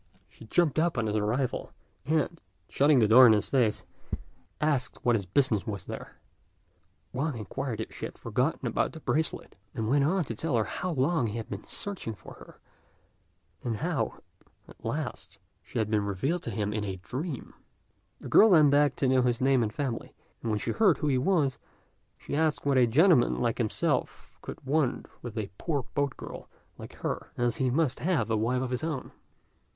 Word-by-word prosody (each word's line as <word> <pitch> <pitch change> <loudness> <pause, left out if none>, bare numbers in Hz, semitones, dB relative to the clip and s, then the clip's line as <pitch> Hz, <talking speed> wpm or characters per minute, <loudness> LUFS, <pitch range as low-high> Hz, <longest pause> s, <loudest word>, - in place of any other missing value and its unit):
She - - -15
jumped 160 +2 +2
up 165 -3 +1
on 115 - +1
his 105 -1 -1
arrival, 115 +5 -1 0.4
and, 160 +2 0 0.3
shutting 145 +1 +4
the 110 -4 +5
door 125 +4 +9
in 110 - +7
his 105 - +1
face, 120 -6 +1 0.8
asked 145 -4 -1
what 120 -1 +4
his 100 -4 -2
business 110 -2 +1
was 100 -4 -4
there. - - -8 0.9
Wang 140 0 -1
inquired 115 +3 -4
if 110 - -5
she - - -5
had - - -8
forgotten - - -1
about - - 0
the 160 - -8
bracelet, 160 +1 -2 0.2
and 110 -1 -2
went 140 +4 +3
on 180 +5 +2
to 120 - -5
tell 145 +4 -2
her 110 - +3
how 180 - -4
long 145 -3 +1
he 105 +2 -4
had 115 - -6
been 100 0 -6
searching 190 - -3
for - - -12
her, - - -15 1.0
and 115 -3 -2
how, - - -2 0.4
at - - -17
last, - - -4 0.2
she - - -8
had 110 -1 0
been 105 -1 +2
revealed 135 - -1
to - - -5
him 105 -1 -2
in 105 -1 -2
a 95 -2 -3
dream. 130 - -6 0.7
The - - -9
girl 220 - +7
then 155 -6 +6
begged 145 -1 +3
to 135 - +1
know 130 0 +4
his 120 -2 +1
name 130 -1 +3
and 110 -2 0
family; 130 -1 -4 0.3
and 115 - -3
when 105 - +1
she - - -2
heard 195 -9 +4
who 150 - 0
he 130 -2 +2
was, 145 -4 +1 0.6
she - - -5
asked 155 -1 +1
what 140 -1 +2
a 125 - +5
gentleman 150 - +4
like 120 0 0
himself 110 -3 -1
could - - -9
want 140 -2 +1 0.2
with 120 -2 -7
a 100 -2 -3
poor 145 -6 -1
boat 140 -1 -1
girl - - -9 0.3
like - - -9
her, - - -4
as 120 +4 0
he 130 -3 +1
must 145 +1 +1
have 145 -10 0
a - - +3
wife 125 +4 0
of 130 - -4
his 125 +4 -2
own. 155 -5 -3
130 Hz, 195 wpm, -28 LUFS, 110-150 Hz, 1.0 s, door